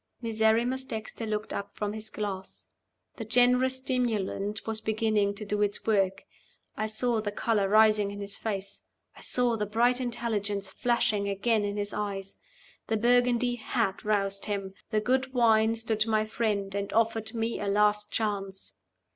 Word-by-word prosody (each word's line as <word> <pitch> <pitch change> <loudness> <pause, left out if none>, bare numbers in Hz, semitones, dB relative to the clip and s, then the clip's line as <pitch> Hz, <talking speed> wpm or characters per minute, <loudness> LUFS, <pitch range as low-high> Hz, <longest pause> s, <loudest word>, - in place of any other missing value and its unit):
Miserrimus 230 +3 +1
Dexter 220 -1 -5
looked 215 0 -3
up 200 0 -5
from 210 0 -2
his 220 0 -4
glass. 200 -3 -5 0.5
The 225 - -4
generous 250 +3 +3
stimulant 220 -5 -1
was 220 -1 -2
beginning 215 -2 +1
to 210 +1 -7
do 205 0 -1
its 205 -1 0
work. 195 -3 +1 0.5
I 215 - -1
saw 225 +1 +1
the 205 -1 -3
color 205 -2 0
rising 215 -1 +5
in 205 0 -7
his 200 0 -4
face. 200 -2 -4 0.3
I - - -14
saw 245 -2 +2
the 210 -1 -2
bright 240 +4 +2
intelligence 210 -5 -2
flashing 215 -4 0
again 210 +2 +1
in 205 0 -2
his 205 0 -2
eyes. 195 -2 -4 0.5
The 220 - +1
Burgundy 245 +1 +3
had 225 -4 -1
roused 200 -2 0
him! 195 -2 -3 0.2
The 215 -1 +1
good 260 +3 0
wine 225 -2 +4
stood 225 -1 0
my 215 -1 +2
friend, 210 -3 -1
and 200 0 -3
offered 225 0 +1
me 230 0 -1
a 205 - -3
last 210 +1 +2
chance! 195 -3 -2
215 Hz, 160 wpm, -28 LUFS, 205-230 Hz, 0.5 s, rising